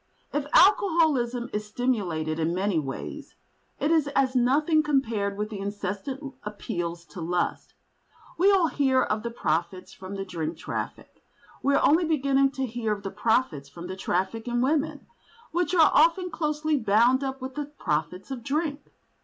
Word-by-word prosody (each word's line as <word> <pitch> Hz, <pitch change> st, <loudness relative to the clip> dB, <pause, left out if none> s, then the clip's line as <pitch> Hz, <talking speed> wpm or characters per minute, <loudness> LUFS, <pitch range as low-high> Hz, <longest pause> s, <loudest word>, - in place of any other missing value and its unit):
If 290 Hz, -1 st, -1 dB
alcoholism 315 Hz, -, +4 dB
is 210 Hz, 0 st, -3 dB
stimulated 185 Hz, -10 st, -1 dB
in 165 Hz, +2 st, 0 dB
many 190 Hz, -2 st, +1 dB
ways, 135 Hz, -3 st, -6 dB, 0.4 s
it 300 Hz, -, +1 dB
is 315 Hz, -3 st, +3 dB
as 265 Hz, -1 st, +2 dB
nothing 295 Hz, +6 st, +3 dB
compared 230 Hz, -9 st, 0 dB
with 210 Hz, +1 st, -3 dB
the 205 Hz, -, -5 dB
incessant 205 Hz, +8 st, -4 dB
appeals 175 Hz, -5 st, -5 dB
to 155 Hz, +3 st, -9 dB
lust. 175 Hz, +1 st, -2 dB, 0.6 s
We 375 Hz, +4 st, +4 dB
all 380 Hz, -3 st, +4 dB
hear 265 Hz, -2 st, +2 dB
of 215 Hz, 0 st, -1 dB
the 235 Hz, -, -3 dB
profits 185 Hz, -2 st, -2 dB
from 190 Hz, +1 st, -8 dB
the 195 Hz, 0 st, -4 dB
drink 165 Hz, -3 st, -4 dB
traffic. -, -, -6 dB, 0.4 s
We 280 Hz, +1 st, +2 dB
are -, -, +4 dB
only 330 Hz, +4 st, +4 dB
beginning 275 Hz, -3 st, +2 dB
to 265 Hz, -, -2 dB
hear 235 Hz, -2 st, -3 dB
of 200 Hz, -1 st, -7 dB
the 195 Hz, -, -4 dB
profits 210 Hz, -, 0 dB
from 170 Hz, +4 st, -9 dB
the 185 Hz, +1 st, -5 dB
traffic 190 Hz, +4 st, -2 dB
in 240 Hz, 0 st, 0 dB
women, 290 Hz, +4 st, 0 dB, 0.5 s
which 355 Hz, +2 st, 0 dB
are 325 Hz, -3 st, +6 dB
often 335 Hz, +4 st, +4 dB
closely 305 Hz, -1 st, 0 dB
bound 235 Hz, +4 st, +3 dB
up 270 Hz, 0 st, -3 dB
with 260 Hz, 0 st, -6 dB
the 295 Hz, +1 st, -3 dB
profits 180 Hz, -, -3 dB
of 260 Hz, -3 st, -4 dB
drink. 290 Hz, +2 st, -2 dB
240 Hz, 165 wpm, -26 LUFS, 190-290 Hz, 0.6 s, are